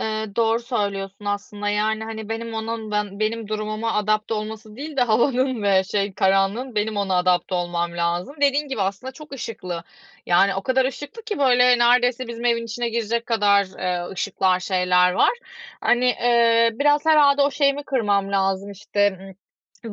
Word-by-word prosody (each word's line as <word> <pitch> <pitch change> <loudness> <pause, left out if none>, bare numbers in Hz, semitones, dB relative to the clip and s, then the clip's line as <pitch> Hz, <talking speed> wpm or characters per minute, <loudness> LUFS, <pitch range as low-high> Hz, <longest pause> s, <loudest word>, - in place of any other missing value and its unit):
Eee, 220 0 -2
doğru 230 0 +2
söylüyorsun 200 -4 -4
aslında. 205 0 -3
Yani, 215 +1 0
hani, 220 -1 -7
benim 225 0 -5
onun 220 -1 -4
ban 210 -1 -3
benim 220 0 -2
durumuma 215 +1 -3
adapte 215 +1 0
olması 215 0 -7
değil 290 +2 -7
de 255 - +3
havanın 245 +1 +1
ve 190 -2 +3
şey, 200 0 -2
karanlığın; 195 +6 +1
benim 210 0 -1
ona 195 -2 0
adapte 180 +1 +1
olmam 175 -1 -2
lazım. 175 - -2
Dediğin 285 +1 +2
gibi 245 -7 -2
aslında 200 +7 -4
çok 300 +2 -13
ışıklı. 185 -9 -6 0.4
Yani, 195 +3 +3
o 195 - -3
kadar 260 +2 +1
ışıklı 290 - -6
ki, 430 -2 -4
böyle, 250 -2 +4
neredeyse 245 +1 +3
bizim 235 0 -7
evin 235 -1 +1
içine 235 +1 -3
girecek 230 0 -2
kadar, 205 -3 +3
eee, 180 -1 -2
ışıklar, 185 -1 0
şeyler 180 -1 +2
var. - - +3 0.5
Hani, 245 +1 +2
eee, 235 -1 +3
biraz 290 +4 +2
herhâlde 290 -2 +5
o 280 - +2
şeyimi 280 0 +1
kırmam 205 -6 0
lazım, 195 0 0
işte. 205 -1 -1 0.7
Iıı, 220 - -6
220 Hz, 165 wpm, -22 LUFS, 200-245 Hz, 0.7 s, herhâlde